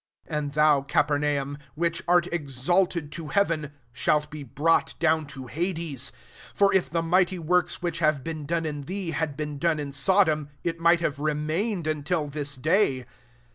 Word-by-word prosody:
23 155 - -3
And 145 -1 -5
thou 150 -2 +4
Capernaum, 145 0 0 0.2
which 170 +1 -1
art 175 -1 +4
exalted 155 +2 0
to 165 -1 -7
heaven, 165 -6 0 0.2
shalt 150 +4 +1
be 150 0 -7
brought 145 +5 +1
down 160 -2 +2
to 135 -3 -9
hades: 160 -3 -3 0.4
for 200 -1 +4
if 190 - +2
the 165 0 -1
mighty 180 +2 +2
works, 180 +2 +1
which 170 -1 -2
have 155 -4 +2
been 155 -2 -5
done 165 0 0
in 150 -2 -3
thee, 180 +3 -4
had 150 -1 -2
been 150 -2 -4
done 165 -1 +2
hi 145 -2 -4
Sodom, 155 0 +2
it 165 -1 -2
might 170 0 +4
have 150 -4 -1
remained 155 +6 -1
until 155 +1 -1
this 145 0 -3
day. 140 - +2
155 Hz, 170 wpm, -26 LUFS, 145-170 Hz, 0.4 s, thou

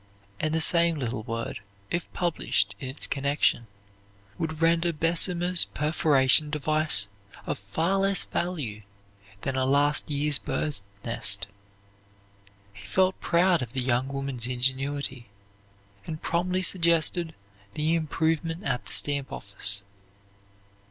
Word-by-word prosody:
And 155 - 0
the 160 0 0
same 170 0 +4
little 120 -4 -3
word, 115 +1 -4 0.3
if 175 0 -3
published 155 - 0
in 130 - -6
its 135 - -1
connection, 140 -4 0 0.7
would 160 -1 -3
render 165 +1 +2
Bessemer's 170 +2 +2
perforation 150 -1 +3
device 150 -8 +2 0.4
of - - -3
far 160 - -1
less 195 0 +2
value 145 -12 -3 0.6
than 135 - -2
a 130 - +1
last 145 +3 +2
year's 145 0 +2
bird's 150 -9 -3 0.2
nest. 100 -4 +2 1.3
He 100 0 -12
felt 185 - +1
proud 175 -1 +3
of 120 -1 -6
the 130 - -1
young 125 +1 0
woman's 135 -3 -4
ingenuity, 130 0 -2 0.8
and 155 -1 -5
promptly 180 +3 -1
suggested 170 -1 +3 0.4
the 155 +2 +1
improvement 165 +1 -1
at 125 -7 -2
the - - -1
stamp 140 -2 +2
office. 100 0 -1
150 Hz, 120 wpm, -26 LUFS, 130-165 Hz, 1.3 s, same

